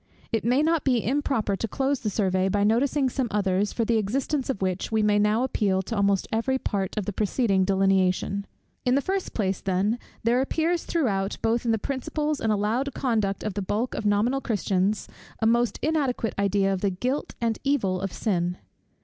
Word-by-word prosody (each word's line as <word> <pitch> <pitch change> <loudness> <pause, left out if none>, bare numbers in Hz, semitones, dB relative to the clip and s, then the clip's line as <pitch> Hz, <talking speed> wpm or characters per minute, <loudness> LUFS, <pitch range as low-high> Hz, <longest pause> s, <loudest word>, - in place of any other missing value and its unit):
It 225 -3 0
may 250 +5 +3
not 325 -1 +2
be 250 -5 +1
improper 255 -5 0
to 225 - -3
close 270 +4 0
the 215 - -2
survey 190 -2 +1
by 200 +1 +1
noticing 260 +6 +2
some 260 0 -1
others, 200 -1 +1
for 230 - -1
the 230 0 +2
existence 265 +6 -1
of 260 - -1
which 185 +1 -2
we 220 -1 +2
may 205 0 +3
now 210 +3 +2
appeal 195 -7 +1
to 225 - -4
almost 200 -2 +2
every 230 +4 +1
part 200 -5 -3
of 210 - -1
the 205 - -3
preceding 200 -2 +1
delineation. 195 0 +1 0.4
In 250 0 +2
the 280 - +3
first 385 +4 -3
place, 195 -4 -1
then, 195 +5 0 0.2
there 240 +3 +3
appears 325 +5 0
throughout, 205 - 0
both 230 +2 +1
in 230 - +2
the 225 - +2
principles 290 +5 -2
and 220 - +1
allowed 225 +7 0
conduct 215 -6 0
of 215 - -2
the 200 - -3
bulk 215 +6 -1
of 210 - -2
nominal 225 +7 +2
Christians, 200 -3 0 0.3
a - - 0
most 235 +1 +2
inadequate 280 -7 0
idea 200 0 +2
of 185 - -3
the 200 - +2
guilt 250 +10 -3
and 230 -2 -1
evil 200 -10 +1
of 195 -1 -3
sin. 180 -4 -1
215 Hz, 195 wpm, -26 LUFS, 195-255 Hz, 0.4 s, may